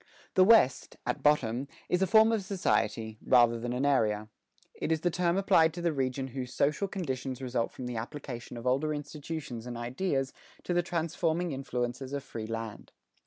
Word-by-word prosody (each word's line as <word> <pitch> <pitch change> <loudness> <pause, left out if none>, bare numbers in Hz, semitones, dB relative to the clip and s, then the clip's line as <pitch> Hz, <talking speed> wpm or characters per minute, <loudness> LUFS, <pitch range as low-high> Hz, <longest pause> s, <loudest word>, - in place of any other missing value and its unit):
The 185 - +6
West, 190 - +4
at 125 - -2
bottom, 135 -3 +2 0.2
is 180 - +1
a 190 - +3
form 220 +3 +6
of 220 -3 0
society, 110 - 0
rather 120 -2 +5
than 120 +1 -3
an 125 +3 0
area. 110 -6 +2 0.4
It - - -3
is 160 -1 +1
the 175 - +1
term 175 +1 +1
applied 165 -5 +4
to 175 - -4
the 170 -2 +2
region 135 -1 -1
whose 125 0 -6
social 150 +8 +1
conditions 135 - -4
result 125 -3 -1
from 130 - -7
the 125 -1 -4
application 120 0 -6
of 115 - -8
older 140 +4 +1
institutions 145 -4 -6
and 120 -1 -5
ideas 135 +3 -1 0.3
to 180 - -1
the 175 - +3
transforming 170 0 -1
influences 130 -1 -3
of 140 -1 -3
free 110 -5 -6
land. 115 -1 -6
135 Hz, 180 wpm, -30 LUFS, 120-165 Hz, 0.4 s, The